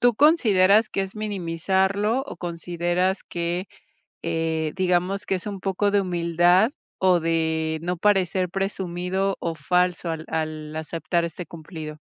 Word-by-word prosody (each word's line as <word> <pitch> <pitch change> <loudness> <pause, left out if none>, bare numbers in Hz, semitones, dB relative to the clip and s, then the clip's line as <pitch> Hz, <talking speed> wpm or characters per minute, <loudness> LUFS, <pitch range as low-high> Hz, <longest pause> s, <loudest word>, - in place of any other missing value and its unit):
¿tú 245 -1 +4
consideras 220 - +5
que 195 - -1
es 190 0 -6
minimizarlo 200 +3 0
o - - -7
consideras 175 +2 -1
que, 175 +2 -3 0.6
eh, 160 -1 -1
digamos, 185 +1 +1
que 195 - 0
es 185 - -4
un 200 -1 -5
poco 195 +2 0
de 205 - +3
humildad, 175 +3 +3 0.3
o 185 -2 +5
de 160 -1 0
no 180 +1 -1
parecer 185 -1 +2
presumido 190 0 -2
o 165 -1 -3
falso 180 +3 +1
al 160 -1 -4
al 155 -1 -3
aceptar 165 +2 -1
este 170 +2 -5
cumplido? 155 -1 -8
180 Hz, 140 wpm, -24 LUFS, 165-195 Hz, 0.6 s, consideras